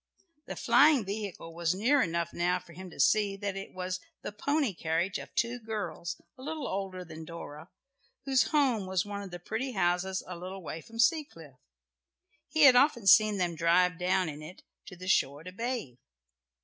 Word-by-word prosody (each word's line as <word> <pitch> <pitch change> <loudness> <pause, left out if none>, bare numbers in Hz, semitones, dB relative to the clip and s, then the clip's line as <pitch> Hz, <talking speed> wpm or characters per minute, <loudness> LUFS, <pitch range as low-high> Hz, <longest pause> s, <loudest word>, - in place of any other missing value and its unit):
The - - -5
flying 290 -7 +5
vehicle 200 -4 -5
was 170 +1 0
near 260 +8 +3
enough 170 -4 -1
now 175 +1 +1
for 170 - -13
him 185 +2 -9
to - - -14
see 200 +8 +3
that 200 -1 -3
it 195 0 -7
was 185 0 -4 0.2
the - - -4
pony 280 +2 0
carriage 170 +3 -1
of - - -10
two 235 +1 0
girls, 210 -6 -5 0.2
a - - -10
little 305 0 -4
older 190 -2 -4
than 160 -1 -9
Dora, 160 0 -9 0.6
whose 265 -2 +3
home 260 -10 +1
was 185 0 0
one 205 0 -5
of 200 - -8
the 175 - -7
pretty 220 +9 -4
houses 185 0 0
a 180 - -7
little 185 +2 -8
way 160 0 -6
from 230 +6 -13
Seacliff. 230 - 0 0.9
He 315 - +2
had 265 -3 +9
often 250 -4 +4
seen 210 0 +6
them 175 -2 0
drive 170 +2 +2
down 180 0 +1
in 150 -1 -6
it 165 +5 -11 0.2
to 180 - -9
the 185 +1 -9
shore 145 -4 +1
to 180 - -8
bathe. 230 - -4
190 Hz, 190 wpm, -30 LUFS, 170-225 Hz, 0.9 s, had